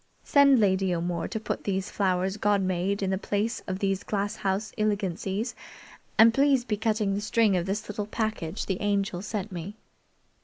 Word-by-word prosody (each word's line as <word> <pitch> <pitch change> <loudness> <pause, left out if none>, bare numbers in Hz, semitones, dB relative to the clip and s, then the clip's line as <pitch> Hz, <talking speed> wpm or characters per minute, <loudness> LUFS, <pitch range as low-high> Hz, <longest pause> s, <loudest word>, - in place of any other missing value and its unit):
Send 280 -3 +5
Lady 190 -3 +2
O'More 170 0 -2
to 220 - -4
put 215 - -4
these 195 -1 -2
flowers 190 0 0
God 205 -1 +2
made 185 +2 -1
in 190 - 0
the 190 - 0
place 210 +3 -1
of 185 -1 -2
these 195 0 0
glass 205 +1 -2
house 195 +2 -1
ilegancies, 205 +1 -1 0.6
and 225 +1 +7
please 275 -1 +3
be 215 - 0
cutting 215 -2 0
the 200 - -2
string 215 -1 +2
of 175 0 -1
this 210 +3 -2
little 210 0 -4
package 215 -4 -3
the 190 -2 -3
Angel's 200 -2 -1
sent 210 -1 -3
me." 180 +3 -6
200 Hz, 180 wpm, -27 LUFS, 190-215 Hz, 0.6 s, and